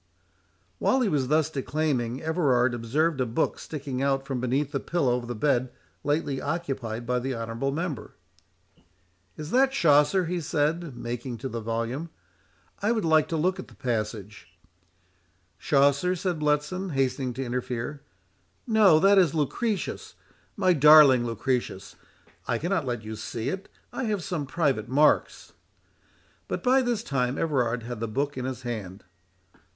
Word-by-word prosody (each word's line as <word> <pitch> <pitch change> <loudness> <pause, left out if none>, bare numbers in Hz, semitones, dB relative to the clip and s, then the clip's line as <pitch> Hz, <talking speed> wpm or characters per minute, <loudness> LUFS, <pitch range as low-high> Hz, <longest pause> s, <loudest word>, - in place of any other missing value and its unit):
'" - - -41
While 265 - +2
he 225 - +2
was 140 -6 0
thus 155 +2 +2
declaiming, 135 -3 -2
Everard 135 -7 +2
observed 135 +6 0
a - - +2
book 115 +8 -1
sticking 140 -4 -5
out 135 -1 0
from 135 -2 -3
beneath 135 +3 0
the 140 - -1
pillow 135 -8 0
of 120 -1 -4
the 120 - -4
bed 130 +1 +1 0.3
lately 145 -2 -1
occupied 135 -8 -3
by 125 +1 0
the 130 +1 -3
honourable 115 +4 -3
member. 150 -6 -4 1.2
"Is 150 +1 -7
that 265 +1 +3
Chaucer?" 150 - +4
he 175 +1 -2
said, 150 -1 -1
making 120 +1 -5
to 130 +4 -5
the 115 -2 -4
volume; 115 +8 -3 0.7
"I 210 +3 +2
would 220 -6 0
like 155 -1 +4
to 165 - -2
look 185 +4 0
at - - -7
the - - -17
passage"— 105 -5 -4 1.1
"Chaucer?" 140 +5 +3
said 180 -2 -2
Bletson, 150 +5 -1
hastening 130 -1 0
to 130 +2 -4
interfere; 125 +3 -4 0.6
"no—that 200 -4 +5
is 170 -4 +3
Lucretius, 195 - -2 0.4
my 185 -2 +3
darling 145 -5 +7
Lucretius. 115 -4 -3 0.5
I - - +1
cannot 170 -4 -1
let 120 -3 -3
you 110 0 -6
see 115 +3 -4
it; 190 +5 -5 0.2
I - - -3
have 210 -5 -1
some 170 -8 -3
private 135 -8 0
marks." 145 +4 +2 0.9
But - - -4
by 260 +1 +4
this 240 -3 -1
time 130 - -1
Everard 125 -7 0
had 120 -1 -6
the 115 - -2
book 140 +6 -2
in 130 -1 -4
his 130 -1 -5
hand. 105 -5 -6
140 Hz, 155 wpm, -26 LUFS, 120-165 Hz, 1.2 s, darling